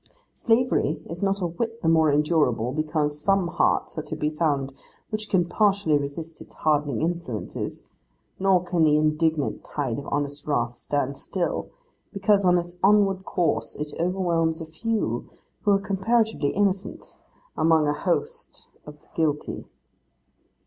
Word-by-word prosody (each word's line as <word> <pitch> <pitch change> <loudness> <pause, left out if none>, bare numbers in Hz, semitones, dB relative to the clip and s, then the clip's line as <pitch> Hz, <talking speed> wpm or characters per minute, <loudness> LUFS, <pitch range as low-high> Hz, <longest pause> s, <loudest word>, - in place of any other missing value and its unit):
Slavery 230 - +1
is 170 - -6
not 195 0 0
a - - +1
whit 225 +7 -4
the - - +1
more 160 -2 +4
endurable 150 -5 +2
because 150 0 -1
some 195 +1 +2
hearts - - +1
are - - -1
to - - -6
be 150 0 -1
found 145 -4 0 0.4
which 215 0 -3
can 180 -3 +3
partially 200 -3 +2
resist 145 +3 -4
its - - -14
hardening 150 -1 +1
influences; 165 -10 -4 0.5
nor 190 -2 +3
can 175 -2 +1
the 150 -1 +5
indignant 155 0 +1
tide 135 -5 -3
of 140 - -9
honest 145 0 -3
wrath 120 -5 0
stand 140 0 -2
still, 180 +3 -3 0.4
because 200 0 +2
in 180 0 +5
its 175 0 -5
onward 195 -1 +4
course 145 -11 0
it 150 0 -5
overwhelms 170 -2 +1
a 165 - -5
few 215 +8 -2 0.3
who 205 - +2
are 195 - +3
comparatively 210 -3 +1
innocent, 195 +1 -2 0.4
among 160 -1 +3
a 145 - +2
host 450 - -3 0.2
of 150 0 -10 0.2
guilty. 155 -3 -1
165 Hz, 145 wpm, -25 LUFS, 150-195 Hz, 0.5 s, the